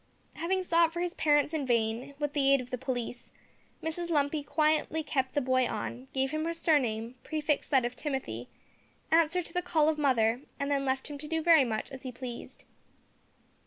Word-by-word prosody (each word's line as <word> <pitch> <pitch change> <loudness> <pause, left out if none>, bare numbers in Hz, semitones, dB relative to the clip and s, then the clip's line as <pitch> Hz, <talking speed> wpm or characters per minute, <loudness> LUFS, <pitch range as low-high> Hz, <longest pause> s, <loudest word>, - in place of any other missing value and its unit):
Having 375 +3 -1
sought 335 -2 +3
for 345 - -5
his 350 0 -1
parents 295 0 +2
in 310 -3 -1
vain, 240 +2 0
with 295 -1 -2
the 275 -2 +3
aid 275 - +5
of 250 -1 -8
the 250 - -1
police, 245 -2 -4 0.5
Mrs 340 +2 -2
Lumpy 295 -1 +1
quietly 310 +1 +1
kept 265 -3 -1
the 290 - +3
boy 255 -1 +2
on; 115 +3 -5
gave 265 0 0
him 310 0 -1
her 335 0 -2
surname, 245 -9 +1
prefixed 305 -2 -1
that 265 -4 +3
of 240 - -3
Timothy, 265 - -4 0.6
answered 330 +2 +3
to - - -10
the 360 - +1
call 310 -3 +2
of 310 -1 -1
mother, 240 -4 +2 0.2
and 280 0 -1
then 275 -1 +1
left 265 0 -1
him 290 -1 -7
to 300 - -7
do 320 0 -1
very 330 -4 +7
much 220 +1 -3
as 265 -1 -8
he 260 - -6
pleased. 245 -1 -8
285 Hz, 200 wpm, -30 LUFS, 255-315 Hz, 0.6 s, very